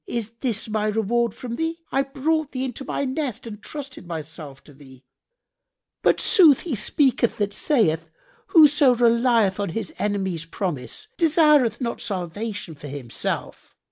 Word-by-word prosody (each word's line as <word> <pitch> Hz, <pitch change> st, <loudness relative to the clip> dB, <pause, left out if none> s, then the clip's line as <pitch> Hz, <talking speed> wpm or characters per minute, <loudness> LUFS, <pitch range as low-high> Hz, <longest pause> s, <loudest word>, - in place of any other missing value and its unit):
Is 230 Hz, -2 st, -3 dB
this 230 Hz, -5 st, -2 dB
my 215 Hz, -1 st, -1 dB
reward 225 Hz, +2 st, +1 dB
from 235 Hz, -2 st, -6 dB
thee? 325 Hz, +1 st, -2 dB
I 270 Hz, -, +2 dB
brought 290 Hz, +3 st, -1 dB
thee 260 Hz, 0 st, -2 dB
into 260 Hz, +1 st, -6 dB
my 280 Hz, -, -2 dB
nest 260 Hz, -3 st, -3 dB
and 210 Hz, -2 st, -8 dB
trusted 280 Hz, -, -8 dB
myself 155 Hz, -4 st, -8 dB
to 145 Hz, -, -16 dB
thee: 135 Hz, -2 st, -16 dB, 1.0 s
but -, -, +3 dB
sooth 315 Hz, -8 st, +5 dB
he 335 Hz, -, -4 dB
speaketh 235 Hz, +2 st, +1 dB
that 205 Hz, -2 st, -1 dB
saith, 165 Hz, -, +1 dB, 0.4 s
'Whoso 295 Hz, -5 st, +6 dB
relieth 235 Hz, -4 st, +3 dB
on 200 Hz, -, -1 dB
his 220 Hz, +7 st, -4 dB
enemy's 190 Hz, -5 st, -2 dB
promise 170 Hz, -, -4 dB
desireth 300 Hz, -8 st, +4 dB
not 235 Hz, -1 st, -3 dB
salvation 200 Hz, -2 st, -4 dB
for 145 Hz, 0 st, -10 dB
himself.' 135 Hz, -4 st, -5 dB
230 Hz, 145 wpm, -23 LUFS, 185-270 Hz, 1.0 s, Whoso